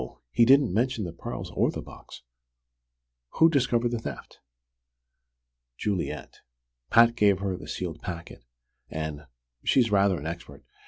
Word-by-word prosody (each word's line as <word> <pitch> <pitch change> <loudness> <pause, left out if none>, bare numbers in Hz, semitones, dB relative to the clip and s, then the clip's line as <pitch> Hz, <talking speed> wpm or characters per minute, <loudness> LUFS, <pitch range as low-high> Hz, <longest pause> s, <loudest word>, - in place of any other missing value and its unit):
He 115 - +5
didn't 135 -4 +5
mention 120 +1 0
the 85 -3 -5
pearls 85 - -6
or - - +2
the - - -4
box. - - -13 1.1
Who 165 0 +5
discovered 120 -5 +2
the 120 - -2
theft?" - - -8 1.4
"Juliet. 100 -4 -3 0.5
Pat 115 0 +6
gave 105 -4 +4
her 95 -1 -2
the 90 - -10
sealed 85 -4 -5
packet, 85 -8 -7 0.5
and 75 -2 -5 0.4
she's 120 -5 +3
rather 100 -2 +3
an 70 - -9
expert! 80 -4 -7
100 Hz, 130 wpm, -27 LUFS, 85-120 Hz, 1.4 s, Pat